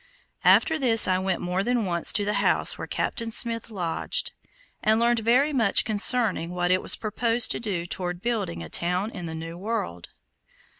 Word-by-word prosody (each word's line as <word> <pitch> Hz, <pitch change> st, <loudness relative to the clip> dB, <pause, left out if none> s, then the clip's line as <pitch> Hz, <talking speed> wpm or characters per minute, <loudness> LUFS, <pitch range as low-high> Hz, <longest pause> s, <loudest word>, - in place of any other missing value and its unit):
After 320 Hz, 0 st, +3 dB
this 230 Hz, -6 st, +4 dB
I 185 Hz, 0 st, +1 dB
went 190 Hz, -1 st, -2 dB
more 180 Hz, +1 st, -2 dB
than 240 Hz, +1 st, -1 dB
once 170 Hz, -2 st, +4 dB
to 205 Hz, -, 0 dB
the 210 Hz, -, -1 dB
house -, -, +1 dB
where -, -, -8 dB
Captain 230 Hz, -1 st, -3 dB
Smith 230 Hz, 0 st, +1 dB
lodged, 180 Hz, -6 st, -1 dB, 0.5 s
and 220 Hz, +1 st, +2 dB
learned 235 Hz, 0 st, +2 dB
very 250 Hz, +7 st, +1 dB
much 225 Hz, -7 st, +2 dB
concerning 215 Hz, -4 st, +3 dB
what 175 Hz, 0 st, -2 dB
it 185 Hz, -, +2 dB
was -, -, +2 dB
proposed 230 Hz, +2 st, 0 dB
to -, -, -1 dB
do 195 Hz, -7 st, -4 dB
toward 175 Hz, 0 st, -5 dB
building 205 Hz, -, -4 dB
a -, -, -9 dB
town 180 Hz, +5 st, -1 dB
in 175 Hz, -6 st, -8 dB
the 160 Hz, -, -7 dB
new 165 Hz, +2 st, -8 dB
world. 180 Hz, -, -5 dB
205 Hz, 185 wpm, -24 LUFS, 175-230 Hz, 0.5 s, this